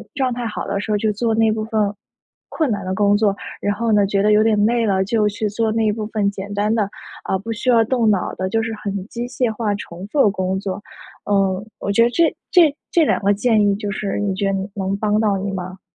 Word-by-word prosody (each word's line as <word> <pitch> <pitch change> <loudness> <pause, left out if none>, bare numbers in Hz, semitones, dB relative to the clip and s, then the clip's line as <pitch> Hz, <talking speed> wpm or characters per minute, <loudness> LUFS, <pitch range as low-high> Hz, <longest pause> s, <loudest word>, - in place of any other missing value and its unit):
状 260 -3 0
态 240 -1 -3
好 210 - -4
的 200 0 -2
时 205 - -6
候 - - +3
就 215 +1 +1
做 225 +1 0
那 225 -1 +3
部 215 0 -2
分 215 -2 0 0.5
困 310 -7 -1
难 200 -3 -3
的 185 0 -2
工 205 0 +3
作， 205 -2 +2 0.2
然 205 0 -1
后 230 +1 -1
呢， 205 -2 +4
觉 200 0 +1
得 210 - +4
有 210 - +5
点 215 -2 +3
累 235 0 +2
了 190 -2 +2
就 210 +2 +1
去 210 +1 -2
做 220 +1 0
那 220 -2 +2
部 215 0 -4
分 205 -2 0
简 200 +1 -7
单 210 +2 +1
的， 210 -3 0 0.4
啊， 190 - 0
不 225 +4 -6
需 230 +3 -2
要 230 -2 +5
动 230 -1 +1
脑 195 -3 0
的， 185 - -2
就 225 +3 0
是 225 0 -3
很 200 -2 -4
机 240 0 -4
械 250 -2 -1
化 210 -2 -1
重 185 -1 -8
复 280 +5 +1
的 - - +5
工 190 -1 -1
作。 195 0 -4 0.5
嗯， 195 0 +1
我 200 - -2
觉 200 - +3
得 235 - +5
这 335 +3 +3 0.2
这 325 -5 +5 0.2
这 335 - +4
2 295 - +1
个 200 +1 +3
建 215 +1 +2
议 200 - +2
就 205 0 -4
是 205 -1 -3
你 205 -2 0
觉 200 0 -1
得 195 - 0
你 195 +1 -3
能 195 0 -1
帮 210 0 +1
到 205 -3 +2
你 195 +1 -3
吗？ 185 0 -6
210 Hz, 275 characters per minute, -20 LUFS, 200-225 Hz, 0.5 s, 有